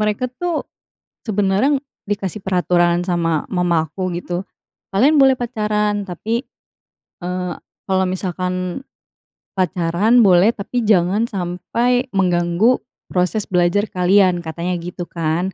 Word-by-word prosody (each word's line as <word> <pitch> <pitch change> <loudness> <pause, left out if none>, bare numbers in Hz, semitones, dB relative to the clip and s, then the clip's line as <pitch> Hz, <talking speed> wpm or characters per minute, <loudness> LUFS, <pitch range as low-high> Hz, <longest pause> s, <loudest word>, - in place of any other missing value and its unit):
mereka 210 +3 0
tuh, 350 -3 -2 0.6
sebenarnya 210 +7 +2 0.2
dikasih 200 -1 -4
peraturan 175 -2 +2
sama 165 -3 0
mama 170 -3 +1
aku, 185 +3 -4
gitu, 175 +1 -4 0.5
“Kalian 270 +11 +4
boleh 270 -1 +6
pacaran, 210 -3 -1
tapi, 225 +8 -3 0.8
eee, 180 0 -3 0.3
kalau 190 -1 +2
misalkan 185 -1 -2 1.0
pacaran 185 +5 +2
boleh, 185 +2 +6
tapi 235 +4 -3
jangan 205 +2 +2
sampai 230 +8 -1
mengganggu 180 +5 +2 0.3
proses 185 +4 0
belajar 180 +3 +2
kalian,” 185 -1 +3
katanya 170 +2 -3
gitu, 175 0 -6
kan. 170 +3 -2
185 Hz, 110 wpm, -19 LUFS, 175-210 Hz, 1.0 s, boleh